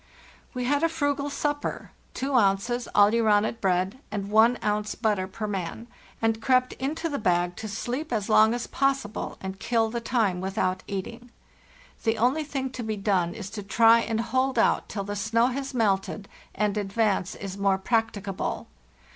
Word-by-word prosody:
"We 250 - -2
had 285 +3 +1
a 330 - +3
frugal 285 -3 -1
supper—2 285 -2 -4
ounces 210 +5 0
aleuronate 215 +1 +4
bread 190 +4 0
and 205 -1 -4
1 225 +3 +5
ounce 210 0 -1
butter 210 -5 0
per 215 +3 -5
man—and 220 +3 -4
crept 255 +1 +2
into 300 +6 -2
the 290 -3 -3
bag 175 -3 +1
to 220 - -5
sleep 245 +8 -4
as 215 -4 -1
long 220 +1 +5
as 240 - -3
possible 270 -6 -1
and 190 0 -6
kill 225 -2 +1
the 235 0 -3
time 220 -7 0
without 190 -1 -1
eating. 230 +5 -6 0.7
The 225 -1 +1
only 255 +8 +2
thing 270 -3 -3
to 255 - -6
be 220 -1 -3
done 190 -4 0
is 205 -3 -7
to 220 - -5
try 225 +3 +5
and 225 -1 -1
hold 260 +2 0
out 225 - +2
till 200 - -3
the 205 +1 -4
snow 230 +4 +2
has 270 +1 -4
melted 200 -2 0 0.3
and 210 0 0
advance 200 -2 0
is 195 -2 -6
more 195 -1 +2
practicable. 205 -2 -2
220 Hz, 165 wpm, -26 LUFS, 200-245 Hz, 0.7 s, 1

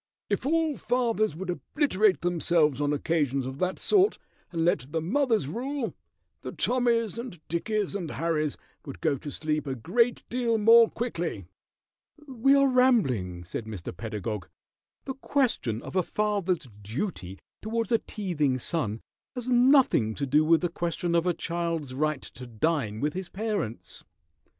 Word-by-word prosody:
"If - - 0
all 320 -1 +1
fathers 230 -7 0
would 180 +2 -3
obliterate 210 - +1
themselves 165 -5 +2
on 145 0 +1
occasions 145 -3 0
of 130 +2 -6
that 185 0 0
sort, 405 0 +3 0.3
and 165 -2 0
let 140 -5 0
the 165 - 0
mothers 225 - +1
rule, 255 - -3 0.5
the - - -6
Tommys 235 -3 +1
and 235 -8 -7
Dickies 205 +5 -1
and 180 -5 -3
Harrys 155 -2 -1 0.3
would 140 - -9
go 155 -3 +1
to 145 - -7
sleep 155 0 -2
a 135 - -2
great 230 - +1
deal 235 -2 0
more 230 +2 +7
quickly." 170 - -3 0.8
"We 270 +1 +3
are 275 0 +5
rambling," 135 - +2
said 95 +6 -6
Mr. 100 -6 -7
Pedagog. 105 -1 -5 0.6
"The 265 - -3
question 250 - -1
of - - -8
a 185 - +4
father's 195 -5 -1
duty 105 - -4 0.2
towards 230 +2 -2
a 230 - +4
teething 155 - -1
son 115 -5 -1 0.3
has 250 0 -3
nothing 245 - +4
to 140 - -2
do 145 +3 +3
with 165 +1 +4
the 175 - 0
question 170 0 -2
of 170 +1 +2
a 180 - +3
child's 165 -5 -3
right 150 0 -1
to 125 - -10
dine 115 -2 -1
with 150 +1 0
his 185 -1 -5
parents." 205 - -4
170 Hz, 155 wpm, -27 LUFS, 140-230 Hz, 0.8 s, more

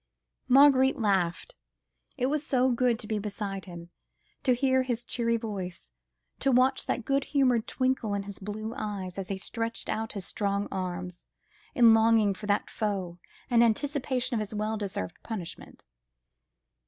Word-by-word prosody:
Marguerite 265 0 +6
laughed. 190 -6 0 0.6
It 250 - 0
was 290 +2 0
so 260 -3 +2
good 245 -1 +2
to 215 - -7
be 215 -1 -1
beside 200 -2 -4
him, 170 -2 -10 0.5
to 255 -3 +3
hear 260 +1 +2
his 245 -2 -2
cheery 230 -1 0
voice, 190 - -6 0.5
to 270 - +2
watch 255 +1 +3
that 240 - -1
good 275 0 +1
humoured 255 -5 +2
twinkle 255 -5 0
in 200 - -2
his 200 -1 -8
blue 215 +3 -5
eyes, 200 -6 -4
as 190 - -4
he 195 - -2
stretched 230 +3 -4
out 220 0 -2
his 200 -4 -6
strong 200 -1 -1
arms, 180 -1 -5 0.5
in 235 -2 +7
longing 225 -2 +4
for 205 +2 -8
that 205 0 +1
foe, 190 -5 -3 0.3
and 235 -1 +5
anticipation 255 +1 0
of 230 - +1
his 215 0 -4
well 215 +1 -1
deserved 195 - -5
punishment. 200 -7 -8
220 Hz, 155 wpm, -28 LUFS, 200-250 Hz, 0.6 s, in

